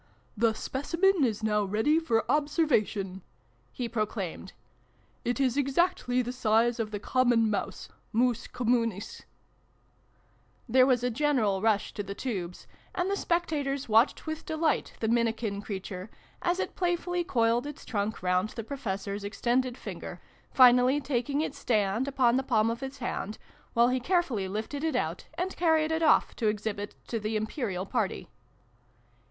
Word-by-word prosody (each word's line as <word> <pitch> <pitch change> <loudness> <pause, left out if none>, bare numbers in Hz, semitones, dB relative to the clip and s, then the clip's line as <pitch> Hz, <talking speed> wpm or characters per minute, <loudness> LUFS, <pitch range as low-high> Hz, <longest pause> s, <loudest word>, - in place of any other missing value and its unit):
" - - -37
The 225 - +4
Specimen 335 - +1
is 220 -4 0
now 210 -1 +2
ready 220 +11 +2
for 230 -9 +1
observation! 260 - +1 0.3
" 120 0 -37
he 245 - -3
proclaimed. 215 -5 -3 0.7
"It 245 +2 -1
is 265 -1 +2
exactly 275 -3 +1
the 245 - -3
size 235 0 +2
of 220 -2 -1
the 210 -1 -4
Common 240 -1 +2
Mouse 205 - -3 0.2
Mus 235 0 +1
Communis! 230 -4 -1 0.8
" - - -37
There 255 +2 +5
was 250 -2 +2
a 250 - +1
general 230 -7 +1
rush 215 -2 +1
to 205 - -3
the 200 0 -6
tubes, 185 -9 -4 0.3
and 365 +2 0
the - - +2
spectators 300 -7 -1
watched 225 +4 +3
with 315 0 -4
delight 315 -3 0
the 220 - +1
minikin 225 -3 0
creature, 190 -1 -6 0.3
as 350 0 +1
it - - -3
playfully 355 0 0
coiled 240 -5 +1
its 295 - -9
trunk 210 -2 -2
round 180 +3 +1
the 230 - -6
Professor's 200 -5 -4
extended 245 +4 0
finger, - - -7 0.3
finally 255 +1 +6
taking 280 +1 -1
its 315 - -4
stand 215 +2 +1
upon 255 -3 +3
the - - +2
palm 225 -3 +2
of 230 - -4
his 270 +1 -6
hand, 225 -4 -4 0.4
while 235 +1 +5
he 255 0 +1
carefully 265 - 0
lifted 220 +9 -4
it 320 -4 0
out, 165 -7 -2
and 370 +2 -2
carried 320 -2 +2
it 320 +1 0
off 315 - +4
to 225 - 0
exhibit 205 -1 -2
to 230 - -2
the 215 +1 -2
Imperial 215 -3 -2
party. - - -2
240 Hz, 160 wpm, -29 LUFS, 215-280 Hz, 0.8 s, finally